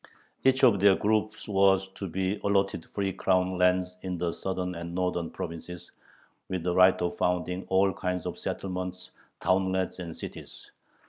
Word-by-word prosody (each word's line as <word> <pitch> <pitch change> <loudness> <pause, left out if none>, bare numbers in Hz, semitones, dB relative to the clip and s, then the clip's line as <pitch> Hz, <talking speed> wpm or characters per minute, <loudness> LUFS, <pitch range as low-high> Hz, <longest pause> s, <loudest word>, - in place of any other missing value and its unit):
Each 130 0 +3
of 115 -6 +6
their 100 0 +6
groups 110 +1 0
was 95 -1 +3
to 95 0 -6
be 95 +3 -1
allotted 100 -4 +1
free 100 -2 -2
crown 95 -1 +1
lands 90 0 +2
in 90 -1 -3
the 85 0 -1
southern 90 0 -3
and 85 0 -6
northern 90 -2 -1
provinces, 85 +1 -7 0.6
with 95 -3 -2
the 90 0 0
right 95 +1 +6
of 85 - -2
founding 90 +1 -1
all 95 +1 +3
kinds 90 -2 -3
of - - -3
settlements, 90 -1 -4 0.3
townlets, 95 0 0
and 85 -3 -7
cities. - - -9
95 Hz, 155 wpm, -28 LUFS, 90-95 Hz, 0.6 s, of